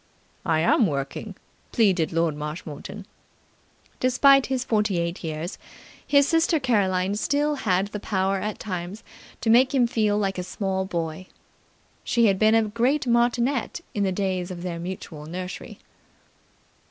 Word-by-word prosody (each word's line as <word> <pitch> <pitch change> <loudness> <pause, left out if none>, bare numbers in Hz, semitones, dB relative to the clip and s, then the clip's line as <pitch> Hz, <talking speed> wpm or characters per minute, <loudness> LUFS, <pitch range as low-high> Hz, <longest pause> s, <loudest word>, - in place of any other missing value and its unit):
"I 160 -1 +2
am 200 +6 +4
working," 145 +7 -4 0.4
pleaded 190 -8 +2
Lord 165 -2 +1
Marshmoreton. 150 +5 -7 0.9
Despite 275 +2 +5
his 260 -2 -1
forty 210 -5 +1
eight 170 +1 -3
years 160 +1 -5 0.5
his 285 -1 +5
sister 330 0 +2
Caroline 195 -7 +1
still 290 +8 +1
had 200 -7 0
the 210 - -5
power 195 -1 0
at 210 +3 -3
times 185 +1 -5 0.4
to 225 - +2
make 260 +4 +5
him 250 -2 +4
feel 215 -3 +1
like 195 -2 -1
a - - -2
small 190 0 -2
boy. 170 -1 -4 0.8
She 235 -1 +2
had 195 -3 +3
been 220 +1 +5
a 225 - +4
great 240 +7 0
martinet 240 +5 +1
in 205 - -2
the 195 -1 +1
days 185 -2 -2
of 175 -1 -7
their 175 -2 -4
mutual 170 -4 -7
nursery. 180 +2 -7
195 Hz, 145 wpm, -25 LUFS, 180-235 Hz, 0.9 s, Despite